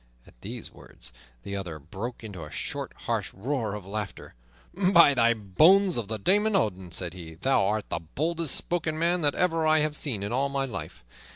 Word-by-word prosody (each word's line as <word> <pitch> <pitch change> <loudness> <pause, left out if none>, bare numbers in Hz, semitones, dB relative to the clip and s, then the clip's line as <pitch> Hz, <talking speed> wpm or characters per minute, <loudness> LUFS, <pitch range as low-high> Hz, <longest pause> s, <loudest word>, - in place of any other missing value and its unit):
At - - -21
these - - -7
words - - -7 0.3
the 100 - -5
other 90 -5 -5
broke 95 - -7
into 100 -7 -7
a 75 - -8
short, - - -3
harsh - - -1
roar 115 0 -2
of 105 -3 -8
laughter. 105 0 -5 0.4
"By 180 -5 +6
the 115 -2 +4
bones 165 - +4
of 115 -4 -1
the 110 +1 -3
Daemon 205 - +2
Odin," 95 - 0
said 85 -1 -4
he, 85 -3 -9
"thou 100 +2 +2
art 105 +1 -1
the - - -2
boldest 160 - -1
spoken 165 -3 0
man 170 +2 +1
that 145 -2 +2
ever 165 -3 +2
I 155 0 +5
have 150 0 0
seen 120 -10 -2
in 100 - -3
all 135 +3 +1
my 140 0 -1
life. 95 - -7
120 Hz, 195 wpm, -27 LUFS, 95-160 Hz, 0.4 s, By